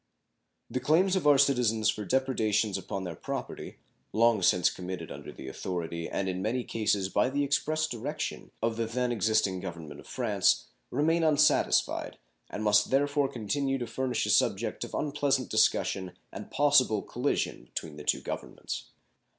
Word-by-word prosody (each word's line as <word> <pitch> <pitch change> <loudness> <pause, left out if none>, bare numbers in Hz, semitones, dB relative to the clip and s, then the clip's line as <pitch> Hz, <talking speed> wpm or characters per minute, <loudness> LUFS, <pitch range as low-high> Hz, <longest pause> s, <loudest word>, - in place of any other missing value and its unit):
The 130 - -2
claims 170 +9 +3
of 180 -5 +1
our 145 -1 +7
citizens 125 -6 +3
for 105 - -6
depredations 110 -5 +1
upon 95 - -4
their 85 -3 -5
property, - - -6 0.4
long 115 -2 +4
since 90 0 +4
committed 90 -2 -6
under 70 0 -8
the 65 - -10
authority, 85 +3 -4
and 95 - -2
in 95 0 -2
many 120 +5 0
instances 105 -5 0
by 105 +5 +1
the 140 +2 0
express 155 +2 +1
direction, 145 +2 -4
of 115 -1 0
the 115 -1 -1
then 125 +2 -1
existing 105 -4 +1
Government 85 -5 -7
of - - -14
France, - - +1 0.2
remain 160 +5 +1
unsatisfied, 150 -1 +2 0.3
and 105 - -5
must 105 -1 +4
therefore 145 +1 +2
continue 135 +5 -1
to 125 - -3
furnish 130 0 -1
a - - +1
subject - - +1
of - - -6
unpleasant 140 -3 0
discussion 95 -2 +1 0.2
and - - -8
possible 135 -7 +3
collision 125 - -2
between 75 +4 -6
the 75 - -8
two - - +1
Governments. - - -6
115 Hz, 160 wpm, -29 LUFS, 95-140 Hz, 0.4 s, our